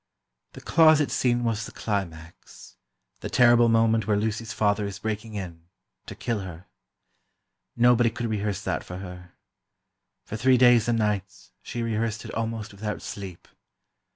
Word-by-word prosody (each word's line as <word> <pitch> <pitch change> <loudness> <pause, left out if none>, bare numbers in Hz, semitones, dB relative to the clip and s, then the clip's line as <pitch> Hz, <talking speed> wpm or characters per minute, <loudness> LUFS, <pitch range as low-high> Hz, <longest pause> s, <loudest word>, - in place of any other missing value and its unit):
The - - -11
closet 155 -3 +4
scene 120 -1 +1
was 110 -2 -1
the - - -11
climax—the 80 - -7
terrible 120 -1 +5
moment 115 -1 +2
where 105 -1 +2
Lucy's 110 +1 -2
father 105 -1 +1
is 100 - -6
breaking 110 0 -5
in, 85 -4 -7 0.4
to - - -7
kill 115 -3 -2
her. 90 -3 -9 1.1
Nobody 120 0 +5
could 115 +1 -5
rehearse 105 -3 -2
that - - -2
for 90 - -8
her. 90 -1 -10 0.9
For 110 - -5
three 130 +3 +4
days 120 -2 +5
and 120 -1 +2
nights, 105 -3 -3
she 120 - -5
rehearsed 115 -1 -2
it - - -8
almost 115 -2 -4
without 105 +1 -5
sleep. 95 -4 -8
110 Hz, 145 wpm, -25 LUFS, 100-115 Hz, 1.1 s, terrible